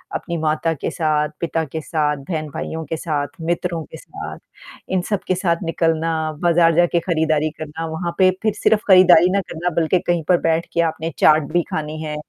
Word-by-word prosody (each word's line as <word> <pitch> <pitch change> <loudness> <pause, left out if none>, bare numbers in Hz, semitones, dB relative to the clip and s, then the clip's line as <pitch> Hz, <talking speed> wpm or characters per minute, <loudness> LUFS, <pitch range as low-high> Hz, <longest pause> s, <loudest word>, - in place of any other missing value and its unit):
अपनी 170 -1 -3
माता 155 +1 0
के 150 - -4
साथ, 150 -2 0
पिता 165 -1 -1
के 160 +3 -6
साथ, 150 -2 -1
बहन-भाइयों 155 +2 -5
के 165 - -4
साथ, 150 -3 -2
मित्रों 170 0 -2
के 160 - -11
साथ, 395 - -9 0.5
इन 185 -1 +1
सबके 195 -3 -1
साथ 170 -2 0
निकलना, 165 0 0 0.3
बाज़ार 170 -1 +4
जाके 175 0 +3
खरीदारी 155 -3 0
करना, 155 +1 -5
वहाँ 170 +2 -4
पे 185 0 +6
फिर 215 -2 +2
सिर्फ़ 210 0 +2
खरीदारी 180 -2 +7
ना 200 0 +1
करना 175 +2 -2
बल्कि 175 +3 +2
कहीं 175 -2 +1
पर 180 - +6
बैठ 165 0 +1
के 170 - +2
आपने 165 +1 -5
चाट 155 -1 +4
भी 175 - +3
खानी 155 0 -4
है। 150 -1 -4
165 Hz, 185 wpm, -20 LUFS, 155-175 Hz, 0.5 s, खरीदारी